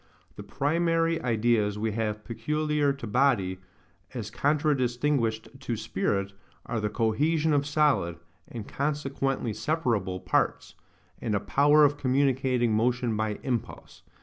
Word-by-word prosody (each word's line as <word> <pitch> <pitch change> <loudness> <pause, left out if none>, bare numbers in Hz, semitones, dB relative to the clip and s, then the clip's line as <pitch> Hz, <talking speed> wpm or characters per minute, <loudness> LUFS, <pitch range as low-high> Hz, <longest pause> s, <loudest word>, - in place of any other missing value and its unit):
The - - -8
primary 165 +2 0
ideas 115 -3 +1
we 110 +1 -1
have 105 -1 -3
PECULIAR 150 +5 0
TO 135 -3 -8
BODY, 105 -6 +1 0.6
as - - -5
contradistinguished 135 -5 0
to 125 -4 -3
spirit, 100 -2 -2 0.3
are 115 -1 -2
the 105 0 -1
COHESION 150 +9 +1
OF 145 0 +1
SOLID, 145 - +2 0.3
AND 115 -4 -8
CONSEQUENTLY 135 -4 -2
SEPARABLE, 110 - -1
PARTS, 90 - 0 0.5
and 110 -3 -1
a - - +2
POWER 145 +7 +4
OF 145 0 +1
COMMUNICATING 130 -3 +1
MOTION 120 +1 +1
BY 110 -1 -1
IMPULSE. 125 -4 -4
125 Hz, 120 wpm, -27 LUFS, 110-145 Hz, 0.6 s, POWER